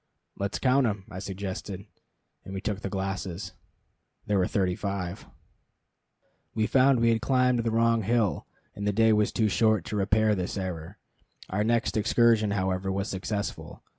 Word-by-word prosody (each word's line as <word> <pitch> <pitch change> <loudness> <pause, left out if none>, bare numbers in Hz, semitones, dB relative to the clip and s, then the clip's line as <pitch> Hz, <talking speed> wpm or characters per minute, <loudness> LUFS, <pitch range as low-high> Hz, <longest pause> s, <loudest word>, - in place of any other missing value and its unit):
"Let's 100 +1 -2
count'em," 125 -7 +2
I 95 - -6
suggested, 95 0 -5 0.6
and 95 - -8
we - - -2
took 100 0 -3
the 100 - -4
glasses. 95 -1 -4 0.7
There 105 -2 +1
were 90 - +2
thirty 95 -3 0
five. 100 -1 -4 1.3
We 110 -1 +2
found 130 +1 +4
we 115 - +4
had 110 -1 +1
climbed 125 -2 +2
the 115 0 0
wrong 115 0 +2
hill, 110 -1 0 0.3
and 100 0 -4
the 105 - +1
day 110 +1 +4
was 105 0 +2
too 110 - +1
short 110 -3 +2
to - - -4
repair 105 +2 +2
this 95 0 -3
error. 90 0 -5 0.5
Our 105 +3 +1
next 115 0 +1
excursion, 115 -1 +3
however, 95 -1 -1
was 100 +2 -2
successful. 100 +2 -4
105 Hz, 160 wpm, -27 LUFS, 95-115 Hz, 1.3 s, found